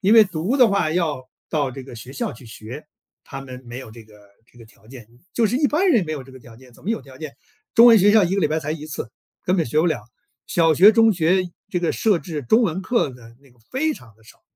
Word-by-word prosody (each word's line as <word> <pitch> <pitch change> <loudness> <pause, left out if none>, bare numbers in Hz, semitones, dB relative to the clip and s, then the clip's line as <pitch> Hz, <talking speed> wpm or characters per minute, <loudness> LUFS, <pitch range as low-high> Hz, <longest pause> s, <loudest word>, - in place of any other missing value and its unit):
因 205 +3 +4
为 220 -2 +8
读 190 - -2
的 250 -4 +6
话 200 -6 0
要 155 -7 -2 0.2
到 145 -4 -1
这 135 0 -9
个 130 - -11
学 120 +4 -10
校 140 - -3
去 125 +2 -14
学， 115 +6 -10 0.4
他 135 - -9
们 130 -1 -10
没 120 +1 -8
有 130 -4 -10
这 115 0 -12
个 110 -1 -20 0.4
这 120 - -21
个 115 - -13
条 110 -1 -23
件， 120 -4 -12 0.3
就 230 -2 +2
是 240 +5 -1
一 290 0 +2
般 355 +6 +1
人 235 - +3
没 155 - -5
有 140 -4 -6
这 135 - -15
个 130 - -13
条 115 -2 -15
件， 125 -1 -18
怎 - - -20
么 200 - -3
有 225 - -1
条 130 -2 -15
件？ 155 -3 -8 0.4
中 235 +1 +7
文 230 -2 +8
学 205 +1 +5
校 210 -3 +5
1 180 +3 -1
个 200 - 0
礼 155 - +2
拜 155 +1 0
才 155 0 -4
1 155 -1 -7
次， 140 -7 -7 0.3
根 185 +1 +1
本 165 - +1
学 135 +6 -1
不 175 - +1
了。 155 -10 -1 0.5
小 165 -2 +3
学、 195 +8 +8
中 225 0 +4
学 180 +2 +1 0.2
这 185 - -1
个 175 -1 -1
设 210 -5 +1
置 160 -4 -6
中 220 - +3
文 190 -2 -1
课 235 - 0
的 115 -2 -15
那 140 - -22
个 120 - -28
非 300 +4 0
常 115 -3 -16
地 110 - -25
少。 - - -19
155 Hz, 295 characters per minute, -21 LUFS, 130-200 Hz, 0.5 s, 为